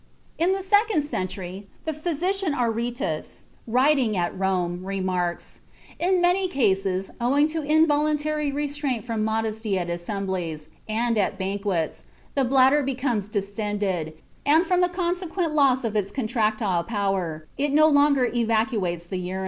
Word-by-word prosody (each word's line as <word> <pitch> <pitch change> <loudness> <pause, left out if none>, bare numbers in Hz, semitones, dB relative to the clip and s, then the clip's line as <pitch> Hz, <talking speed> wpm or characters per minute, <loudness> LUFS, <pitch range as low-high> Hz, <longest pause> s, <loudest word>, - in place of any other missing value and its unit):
In 350 +3 +3
the 390 0 -3
second 410 -3 +3
century 190 -6 -5 0.2
the 315 - -1
physician 350 +3 -1
Aretæus, 235 - -2 0.2
writing 255 -2 +3
at 175 -1 -1
Rome, 180 -2 -1
remarks: 185 -2 -2 0.4
"In 365 +1 +2
many 360 +2 +3
cases, 195 - 0
owing 275 +5 +3
to 320 +1 -2
involuntary 300 -1 +2
restraint 285 -5 -2
from 225 -3 -2
modesty 220 -2 -1
at 175 -1 -2
assemblies, 175 -4 -4 0.2
and 230 +1 +1
at 200 - 0
banquets, 190 -3 -2 0.3
the 275 - +2
bladder 265 +3 +4
becomes 255 -6 -1
distended, 200 -5 -2 0.3
and 315 +5 +4
from 360 +1 +2
the 360 - +3
consequent 350 -1 -2
loss 275 -3 +3
of 220 -2 -2
its 200 -2 0
contractile 215 -7 0
power, 190 -6 -2
it 285 +2 0
no 310 +2 +6
longer 285 -3 +4
evacuates 220 -7 0
the 185 - -3
urine." 180 +1 -4
230 Hz, 135 wpm, -24 LUFS, 195-295 Hz, 0.4 s, no